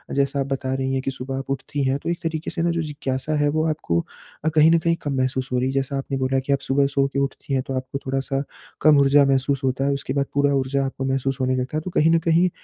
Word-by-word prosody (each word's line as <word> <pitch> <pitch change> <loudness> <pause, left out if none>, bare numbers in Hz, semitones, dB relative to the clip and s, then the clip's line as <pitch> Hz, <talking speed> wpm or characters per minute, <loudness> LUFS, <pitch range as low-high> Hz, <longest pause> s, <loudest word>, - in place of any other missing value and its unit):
जैसा 140 0 +1
आप 135 - 0
बता 130 0 -2
रही 135 0 -1
हैं 135 - 0
कि 135 - 0
सुबह 135 +1 -5
आप 135 - -6
उठती 140 +1 -2
है 135 +1 +1
तो - - -2
एक 170 0 -1
तरीके 160 -1 -2
से 165 - -3
ना 170 0 +2
जो 170 - -1
जिज्ञासा 145 -1 -3
है 145 0 +3
वो 155 +1 +1
आपको 85 - 0 0.5
अ, - - +4
कहीं 155 +1 +5
न 170 - +5
कहीं 165 +1 +1
कम 145 - -2
महसूस 130 0 -1
हो 125 - +1
रही 125 - +1
है। - - -3
जैसा 135 0 -1
आपने 135 0 -3
बोला 130 0 +1
कि 135 +2 0
आप 140 - +1
सुबह 140 +1 +3
सो 135 0 +3
के 140 0 -3
उठती 140 0 -3
हैं 130 -1 +1
तो 135 - -3
आपको 130 +1 -4
थोड़ा-सा 135 +1 -1 0.4
कम 150 -1 +6
ऊर्जा 140 +1 +5
महसूस 135 0 +1
होता 135 +1 0
है, 140 - +2
उसके 140 -1 -3
बाद 140 0 +1
पूरा 145 0 +2
ऊर्जा 135 0 0
आपको 135 0 -4
महसूस 135 0 -1
होने 130 0 +1
लगता 130 +4 -2
है। - - -1
तो 185 - -5
कहीं 160 0 +3
न 165 - +4
कहीं 170 +2 +3
135 Hz, 285 wpm, -23 LUFS, 135-150 Hz, 0.5 s, कम